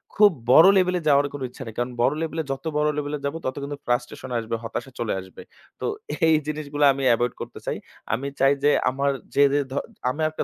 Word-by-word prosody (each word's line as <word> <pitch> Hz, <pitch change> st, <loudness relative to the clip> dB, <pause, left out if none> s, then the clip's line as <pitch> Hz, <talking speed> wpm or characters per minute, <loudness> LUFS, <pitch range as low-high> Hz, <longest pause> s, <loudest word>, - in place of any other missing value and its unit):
খুব 205 Hz, -1 st, +7 dB, 0.2 s
বড় 165 Hz, +8 st, +9 dB
লেভেলে 180 Hz, -1 st, +2 dB
যাওয়ার 145 Hz, 0 st, +5 dB
কোন 145 Hz, -, -6 dB
ইচ্ছা 130 Hz, -, -9 dB
নেই। 110 Hz, -, -8 dB
কারণ 120 Hz, +1 st, -1 dB
বড় 130 Hz, +4 st, +3 dB
লেভেলে 160 Hz, 0 st, -2 dB
যত 135 Hz, +4 st, -5 dB
বড় 150 Hz, 0 st, +2 dB
লেভেলে 150 Hz, 0 st, -2 dB
যাব 140 Hz, +3 st, -2 dB
তত 130 Hz, -, -2 dB
কিন্তু 145 Hz, 0 st, -5 dB
frustration 120 Hz, +1 st, -2 dB
আসবে, 115 Hz, 0 st, -3 dB
হতাশা 120 Hz, +3 st, -5 dB
চলে 115 Hz, -2 st, -1 dB
আসবে। 95 Hz, 0 st, -12 dB, 0.4 s
তো -, -, -4 dB, 0.4 s
এই 160 Hz, -, +5 dB
জিনিসগুলা 150 Hz, -1 st, -1 dB
আমি 135 Hz, 0 st, -4 dB
এভয়েড 120 Hz, +1 st, 0 dB
করতে -, -, -7 dB
চাই। -, -, -2 dB, 0.4 s
আমি 135 Hz, +4 st, -2 dB
চাই 135 Hz, +1 st, +5 dB
যে 145 Hz, -, +5 dB, 0.2 s
আমার 140 Hz, +2 st, 0 dB, 0.2 s
যে, 140 Hz, -, +6 dB
যে 145 Hz, -, +3 dB
ধ -, -, -5 dB, 0.4 s
আমার 155 Hz, +4 st, -1 dB
একটা -, -, -3 dB
140 Hz, 215 wpm, -24 LUFS, 125-150 Hz, 0.4 s, বড়